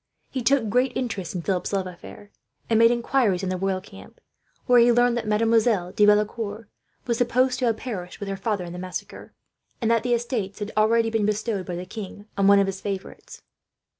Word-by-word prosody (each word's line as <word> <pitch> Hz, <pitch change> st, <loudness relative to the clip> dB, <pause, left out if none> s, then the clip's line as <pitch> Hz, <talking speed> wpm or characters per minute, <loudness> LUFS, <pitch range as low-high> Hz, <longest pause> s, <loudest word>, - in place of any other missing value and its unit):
He 260 Hz, -, -3 dB
took 265 Hz, -2 st, +2 dB
great 250 Hz, +4 st, +1 dB
interest 225 Hz, -8 st, -4 dB
in 175 Hz, -, -3 dB
Philip's 185 Hz, -1 st, -1 dB
love 195 Hz, -1 st, 0 dB
affair, 195 Hz, +3 st, -11 dB, 0.4 s
and 225 Hz, -1 st, +2 dB
made 230 Hz, 0 st, +7 dB
inquiries 235 Hz, -5 st, +1 dB
in 190 Hz, -, -1 dB
the 185 Hz, -, -1 dB
royal 190 Hz, 0 st, -1 dB
camp; 205 Hz, -, -14 dB, 0.5 s
where 245 Hz, -1 st, +5 dB
he 240 Hz, +1 st, +6 dB
learned 245 Hz, 0 st, +3 dB
that 230 Hz, -2 st, -3 dB
Mademoiselle 220 Hz, -3 st, +2 dB
de 210 Hz, 0 st, +3 dB
Valecourt 210 Hz, +1 st, +1 dB, 0.4 s
was 235 Hz, -2 st, -1 dB
supposed 255 Hz, +1 st, +2 dB
to 255 Hz, -, +1 dB
have 230 Hz, -2 st, +1 dB
perished 190 Hz, -9 st, -6 dB
with 205 Hz, -, -5 dB
her 195 Hz, -, -3 dB
father, 195 Hz, -1 st, -2 dB
in 170 Hz, -, -8 dB
the 180 Hz, -, -7 dB
massacre; 185 Hz, 0 st, -7 dB, 0.5 s
and 230 Hz, -1 st, +1 dB
that 230 Hz, -1 st, +3 dB
the 245 Hz, 0 st, +1 dB
estates 230 Hz, -5 st, -3 dB
had 210 Hz, 0 st, -5 dB
already 225 Hz, +1 st, +3 dB
been 220 Hz, -2 st, +1 dB
bestowed, 210 Hz, -2 st, -2 dB
by 180 Hz, -, -4 dB
the 180 Hz, +1 st, -5 dB
king, 205 Hz, 0 st, -8 dB
on 195 Hz, -1 st, +2 dB
one 200 Hz, 0 st, +7 dB
of 200 Hz, -, +4 dB
his 195 Hz, 0 st, -5 dB
favourites. 195 Hz, -2 st, -7 dB
215 Hz, 210 wpm, -24 LUFS, 195-235 Hz, 0.5 s, made